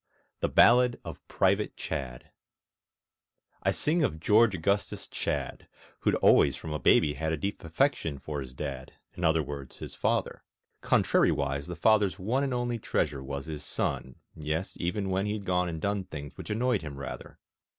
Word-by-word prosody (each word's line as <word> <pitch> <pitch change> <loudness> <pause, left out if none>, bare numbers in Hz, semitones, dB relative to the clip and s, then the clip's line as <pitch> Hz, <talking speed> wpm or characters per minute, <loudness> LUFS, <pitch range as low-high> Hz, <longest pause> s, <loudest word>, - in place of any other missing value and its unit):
THE - - 0
BALLAD 125 0 +5
OF - - -8
PRIVATE - - +1
CHADD 60 -2 -5 1.3
I - - +1
sing 165 +3 +1
of 80 - 0
George 105 +4 +4
Augustus 100 +4 -1
Chadd, - - -3 0.3
Who'd - - +2
always 70 - +5
from 80 - -6
a 75 - -2
baby 75 -2 +4
had 80 +1 -2
A 80 - 0
deep 100 +7 -4
affection 85 - 0
for 75 +1 -5
his 65 -1 -9
Dad 65 -2 -6 0.2
In 85 - -7
other 80 -1 +3
words, 70 -2 -7
his - - -8
Father; - - -1 0.4
Contrariwise, 70 +1 +2
the 90 - -5
father's 100 +1 +3
one 115 +9 0
And 140 - -1
only 120 -1 -1
treasure 70 -8 -1
was 70 0 -5
his 75 -2 -6
son, 65 -2 -2 0.2
Yes, 80 +4 -3
even 95 +2 -1
when 95 +2 0
he'd 105 -1 -3
gone 90 -1 +1
and 80 -1 -5
done 100 +2 -1
Things 70 -4 -8
which - - -9
annoyed 120 +4 +1
him 75 -3 -7
rather. 70 - -7
85 Hz, 170 wpm, -29 LUFS, 75-105 Hz, 1.3 s, BALLAD